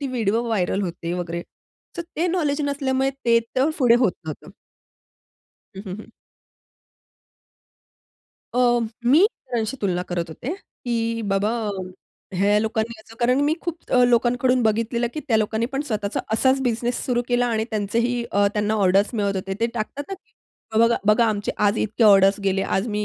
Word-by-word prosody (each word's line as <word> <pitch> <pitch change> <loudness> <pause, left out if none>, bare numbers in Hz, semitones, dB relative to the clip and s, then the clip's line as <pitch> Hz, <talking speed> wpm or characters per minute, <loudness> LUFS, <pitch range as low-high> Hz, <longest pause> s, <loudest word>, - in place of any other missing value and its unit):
ती 280 - -2
video 230 -3 0
viral 200 -3 0
होते 170 -1 -4
वगैरे. 170 -1 -3 0.5
तर 340 - -2
ते 340 +3 +1
नॉलेज 310 -5 0
नसल्यामुळे 270 -2 0
ते 230 -1 +5 0.2
तर 270 +4 +2
पुढे 245 -3 +5
होत 225 -8 +3
नव्हतं. 155 -2 -8 1.3
हं, 195 - -6
हं, 185 0 -5
हं. - - -14 2.4
अ, - - 0 0.5
मी 305 +11 +6
सरांशी 235 - -4
तुलना 180 -2 0
करत 175 -2 -3
होते, 255 - -5
की 230 -9 -3
बाबा 200 +2 +1 0.9
ह्या 205 +2 +4
लोकांनी 220 +1 -2
असं 225 +1 -16
कारण 250 +3 +3
मी 295 - +2
अ, 320 - -1
खूप 345 -1 -3 0.3
लोकांकडून 245 +1 +2
बघितलेलं 230 +2 +1
की 305 - -3
त्या 225 - +4
लोकांनी 220 +1 0
पण 270 - -1
स्वतःचा 210 -2 -2
असाच 260 +4 +3
बिझनेस 240 0 -1
सुरू 245 -1 +1
केला 245 0 +2
आणि 220 -2 0
त्यांचेही 230 +4 0
अ, 200 0 +3
त्यांना 210 +1 0
ऑर्डर्स 195 0 +3
मिळत 200 -3 0
होते. 190 0 -3
ते 230 - +3
टाकतात 240 +5 -4
ना, 390 - -4
की - - -24 0.5
बघा, 230 +1 +4
बघा 215 +2 +5
आमचे 205 -2 -1
आज 210 +1 +2
इतके 220 +2 +1
ऑर्डर्स 195 0 +6
गेले. 195 0 +1
आज 190 +3 -1
मी 210 -1 -1
225 Hz, 165 wpm, -23 LUFS, 205-245 Hz, 2.4 s, मी